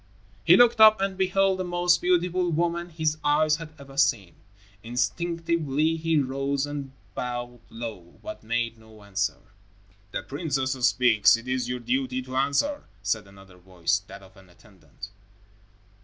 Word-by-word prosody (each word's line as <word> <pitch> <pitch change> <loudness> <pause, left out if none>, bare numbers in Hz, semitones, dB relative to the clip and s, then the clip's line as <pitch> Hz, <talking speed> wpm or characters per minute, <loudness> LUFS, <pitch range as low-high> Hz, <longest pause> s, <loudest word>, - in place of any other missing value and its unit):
He 175 +2 +7
looked 240 -2 +5
up 215 -1 +8
and 195 0 -1
beheld 190 0 +1
the - - -1
most 175 0 +2
beautiful 180 0 +1
woman 170 +1 -1
his 155 -2 -1
eyes 150 +1 +3
had 165 -2 -8
ever 135 -1 -13
seen. 100 - +2 0.5
Instinctively, 160 - -1
he 165 0 0
rose 135 0 -1
and 145 -2 -6 0.2
bowed 120 +1 -5
low, 110 -7 -8
but 320 0 -7
made 115 0 -2
no 110 -1 -17
answer. 100 0 -2 0.7
"The - - -4
princess 140 -3 -2 0.2
speaks. 115 -3 +4
It 115 +2 -12
is 125 -1 -1
your 125 0 -3
duty 130 +1 -1
to 130 0 -8
answer," 140 - 0 0.2
said 100 +1 -1
another 95 -2 -16
voice, 90 -1 -1
that 100 - -11
of 95 - -18
an 95 -1 -18
attendant. 95 +1 -14
135 Hz, 150 wpm, -26 LUFS, 115-170 Hz, 0.7 s, up